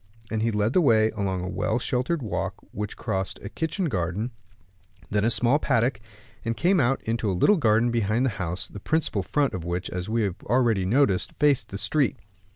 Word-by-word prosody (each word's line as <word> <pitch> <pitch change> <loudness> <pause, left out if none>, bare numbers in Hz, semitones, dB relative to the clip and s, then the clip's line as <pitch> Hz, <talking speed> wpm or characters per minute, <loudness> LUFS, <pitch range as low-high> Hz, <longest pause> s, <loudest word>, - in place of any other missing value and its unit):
And 110 -1 -1
he 115 - +2
led 105 +2 0
the 185 - +4
way 110 -7 +4
along 95 -4 -2
a - - -3
well 110 +4 -1
sheltered 130 +5 -1
walk, 110 - -2 0.2
which 105 +1 -5
crossed 95 0 -2
a 100 - -5
kitchen 160 - -2
garden, 100 - -2 0.8
then 105 0 +1
a 115 - +3
small 125 +4 +3
paddock, 120 -4 +1 0.4
and 115 0 -2
came 185 +2 +3
out 135 0 +1
into 115 -1 -1
a 95 - -1
little 205 - +5
garden 115 -3 +3
behind 115 +2 +1
the 130 - +1
house, 90 +1 -2
the 105 - -9
principal 150 -4 0
front 140 +7 0
of 90 - -4
which, 85 +2 -3
as 90 +2 -4
we 115 0 +1
have 100 -1 -3
already 115 -5 +2
noticed, 95 -7 +2
faced 145 -3 +2
the 100 - -5
street. 130 +6 +1
110 Hz, 200 wpm, -25 LUFS, 100-130 Hz, 0.8 s, little